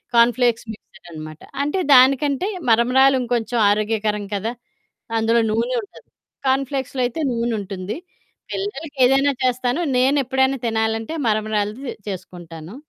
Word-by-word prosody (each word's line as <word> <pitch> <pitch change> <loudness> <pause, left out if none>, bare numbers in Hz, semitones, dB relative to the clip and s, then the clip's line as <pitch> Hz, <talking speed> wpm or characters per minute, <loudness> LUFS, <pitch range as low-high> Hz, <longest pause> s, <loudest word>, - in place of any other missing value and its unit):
Corn 235 +1 +6
flakes 240 -2 +1
మిక్సుడనమాట. 155 -6 -12 0.2
అంటే, 295 +6 -1
దానికంటే 275 +6 +4 0.2
మరమరాలు 255 +4 +5
ఇంకొంచం 240 -1 -1
ఆరోగ్యకరం 210 0 0
కదా! 220 +4 -2 0.7
అందులో 230 +1 +3
నూనె 235 +3 0
ఉంటది. - - -16 0.4
కార్న్ 265 0 +2
ఫ్లేక్స్‌లో 265 -1 -3
అయితే 250 +7 -3
నూనుంటుంది. 215 -3 -3 0.5
పిల్లలకేదైనా 285 -8 +1
చేస్తాను. 255 +3 0 0.2
నేనెప్పుడైనా 265 0 +2
తినాలంటే, 220 +4 -1
మరమరాలది 215 +3 -1 0.2
చేసుకుంటాను. 175 0 -8
235 Hz, 100 wpm, -21 LUFS, 215-265 Hz, 0.7 s, కార్న్